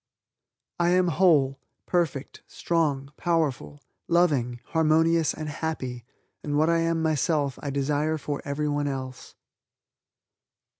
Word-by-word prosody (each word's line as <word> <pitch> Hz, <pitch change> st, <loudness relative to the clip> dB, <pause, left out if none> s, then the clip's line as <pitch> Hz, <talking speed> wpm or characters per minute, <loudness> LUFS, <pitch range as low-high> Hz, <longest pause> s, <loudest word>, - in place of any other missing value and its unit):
"I 175 Hz, 0 st, +3 dB
am 180 Hz, 0 st, +3 dB
whole, 150 Hz, -6 st, +3 dB, 0.3 s
perfect, 165 Hz, -6 st, -2 dB
strong, 145 Hz, -5 st, -1 dB
powerful, 155 Hz, -4 st, -1 dB, 0.2 s
loving, 145 Hz, -9 st, +2 dB
harmonious 160 Hz, 0 st, +3 dB
and 155 Hz, -, -6 dB
happy 140 Hz, -6 st, -4 dB, 0.4 s
and 145 Hz, -1 st, -1 dB
what 155 Hz, +2 st, +3 dB
I 165 Hz, -, +2 dB
am 165 Hz, 0 st, 0 dB
myself 150 Hz, -3 st, 0 dB
I 145 Hz, -, -4 dB
desire 145 Hz, +3 st, 0 dB
for 145 Hz, -1 st, -4 dB
everyone 145 Hz, 0 st, -1 dB
else." 130 Hz, -2 st, -6 dB
150 Hz, 110 wpm, -26 LUFS, 140-165 Hz, 0.4 s, I